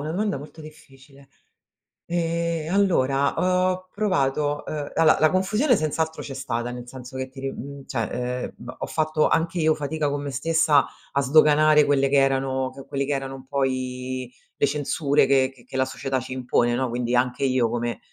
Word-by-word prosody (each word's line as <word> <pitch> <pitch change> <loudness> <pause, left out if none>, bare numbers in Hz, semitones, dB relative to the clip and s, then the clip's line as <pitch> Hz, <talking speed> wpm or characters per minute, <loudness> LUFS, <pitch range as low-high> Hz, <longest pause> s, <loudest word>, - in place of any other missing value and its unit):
una 155 - -4
domanda 200 0 -1
molto 150 +3 -11
difficile. 140 -3 -15 0.8
Ehm, 170 -1 -1
allora 140 -8 +2 0.4
ho 185 0 -4
provato 145 -7 0
uhm, 150 -2 -5
allora 160 -1 +4
la 155 0 +5
confusione 210 +9 +2
senz'altro 160 -1 -1
c'è 135 - -7
stata, 120 -2 -3
nel 125 0 -8
senso 130 0 -9
che 130 0 -4
ti 135 0 -12
ri 135 - -2
mhmm, 140 0 -9
cioè, 115 -5 -2 0.4
ehm, - - -8 0.2
h - - -7
ho - - -4
fatto 155 -1 +1
anche 165 +2 0
io 155 0 +4
fatica 150 0 -2
con 145 0 -2
me 140 - -4
stessa 160 +1 +3 0.3
a 140 - +1
sdoganare 150 +1 +5
quelle 140 -1 +2
che 140 - +1
erano 135 -1 +1 0.2
quelli 140 0 -2
che 145 - -3
erano 135 -1 -3
un 130 0 -12
po' 140 -1 +1
i 130 -1 -4 0.3
le - - +4
censure 145 0 +1
che 135 -1 +3
che 125 - -20
che 130 - -11
la 130 - +3
società 130 0 -3
ci 130 - -9
impone 120 -2 +1
no? 130 +1 0
Quindi 120 0 -2
anche 125 +2 +1
io 130 -3 +2
come, 120 0 -2
140 Hz, 190 wpm, -24 LUFS, 130-155 Hz, 0.8 s, la